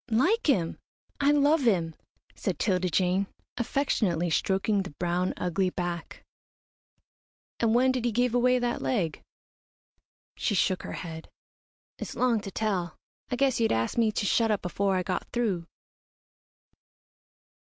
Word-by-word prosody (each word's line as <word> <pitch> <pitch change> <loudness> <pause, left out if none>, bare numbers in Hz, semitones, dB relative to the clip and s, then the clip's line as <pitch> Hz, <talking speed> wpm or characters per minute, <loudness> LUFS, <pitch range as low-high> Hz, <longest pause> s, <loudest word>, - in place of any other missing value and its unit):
"Like 345 - +2
him! 175 -11 +1 0.4
I 280 - +3
love 295 +2 +4
him," 180 -10 +2 0.4
said - - -3
'Tilda 185 -3 +1
Jane, 185 +3 +1 0.3
affectionately 210 - 0
stroking 195 +4 +1
the 185 -6 -8
brown, 180 +1 0
ugly 180 +1 0
back. 175 -2 -5 1.4
"And 230 -1 +2
when 255 +2 +4
did 255 -2 -2
he 240 - +2
give 245 +2 +1
away 250 +1 +4
that 245 -1 -1
leg?" 185 -11 -1 1.2
She 205 - 0
shook 185 0 +1
her - - -6
head. 160 -2 -7 0.7
"It's - - -6
long 240 -4 +2
to 200 - -6
tell. 190 -5 -2 0.3
I 250 - -1
guess 265 -1 +2
you'd 225 - +2
ask 115 0 0
me 230 -2 +3
to 205 - -1
shut 225 +3 +2
up 210 -3 0
afore 195 +2 0
I 185 - 0
got 185 - -3
through." 200 -9 -1
205 Hz, 140 wpm, -28 LUFS, 180-245 Hz, 1.4 s, love